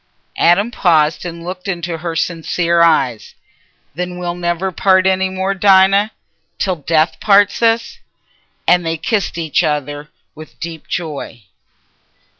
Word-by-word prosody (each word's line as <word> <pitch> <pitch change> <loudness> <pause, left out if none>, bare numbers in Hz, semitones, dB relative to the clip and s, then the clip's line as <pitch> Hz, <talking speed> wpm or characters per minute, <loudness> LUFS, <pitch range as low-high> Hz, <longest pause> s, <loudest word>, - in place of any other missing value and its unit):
Adam 200 +7 +3
paused 160 -6 +2
and 170 -1 -7
looked 180 +2 -7
into 170 -3 -3
her 165 0 -4
sincere 170 +1 0
eyes. 135 -9 +1 0.6
"Then 180 +3 -5
we'll 175 -1 -3
never 175 +2 -2
part 185 +1 +3
any 190 0 +2
more, 190 +1 -2
Dinah, 195 +1 +4 0.5
till 185 -3 -1
death 155 +2 0
parts 200 0 +3
us." 230 0 +1 0.7
And 180 0 +4
they 165 0 -2
kissed 195 +1 -2
each 165 +1 0
other 150 -1 -3 0.2
with 155 0 -12
a - - -38
deep 165 -2 -7
joy. 145 -9 -5
175 Hz, 135 wpm, -16 LUFS, 160-190 Hz, 0.7 s, Dinah